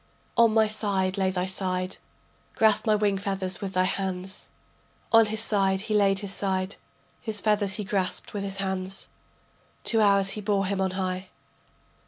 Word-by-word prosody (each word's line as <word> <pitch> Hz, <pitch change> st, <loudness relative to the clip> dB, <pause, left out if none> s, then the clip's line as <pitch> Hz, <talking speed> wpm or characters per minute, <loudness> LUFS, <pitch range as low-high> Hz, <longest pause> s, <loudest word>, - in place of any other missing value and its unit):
On 230 Hz, -1 st, +5 dB
my 220 Hz, 0 st, +4 dB
side 200 Hz, -3 st, 0 dB
lay 190 Hz, -2 st, +1 dB
thy 185 Hz, -1 st, -1 dB
side, 185 Hz, -1 st, -1 dB, 0.6 s
Grasp 215 Hz, 0 st, +3 dB
my 215 Hz, -, +5 dB
wing 205 Hz, -2 st, +1 dB
feathers 195 Hz, -2 st, -2 dB
with 195 Hz, -1 st, -4 dB
thy 185 Hz, -, +3 dB
hands. 190 Hz, 0 st, -2 dB, 0.6 s
On 225 Hz, -1 st, +6 dB
his 215 Hz, 0 st, -2 dB
side 195 Hz, -3 st, +2 dB
he 215 Hz, -, -3 dB
laid 195 Hz, -2 st, +3 dB
his 200 Hz, -1 st, -2 dB
side, 190 Hz, 0 st, -1 dB, 0.4 s
His 220 Hz, -3 st, -1 dB
feathers 210 Hz, -2 st, +1 dB
he 210 Hz, -, -3 dB
grasped 190 Hz, -2 st, -2 dB
with 205 Hz, -1 st, -3 dB
his 195 Hz, -1 st, -4 dB
hands. 190 Hz, 0 st, -2 dB, 0.7 s
Two 225 Hz, -1 st, +2 dB
hours 200 Hz, -2 st, +4 dB
he 210 Hz, -, -5 dB
bore 200 Hz, -1 st, +1 dB
him 195 Hz, 0 st, -1 dB
on 190 Hz, -, +1 dB
high. 185 Hz, 0 st, -2 dB
195 Hz, 170 wpm, -26 LUFS, 190-210 Hz, 0.7 s, On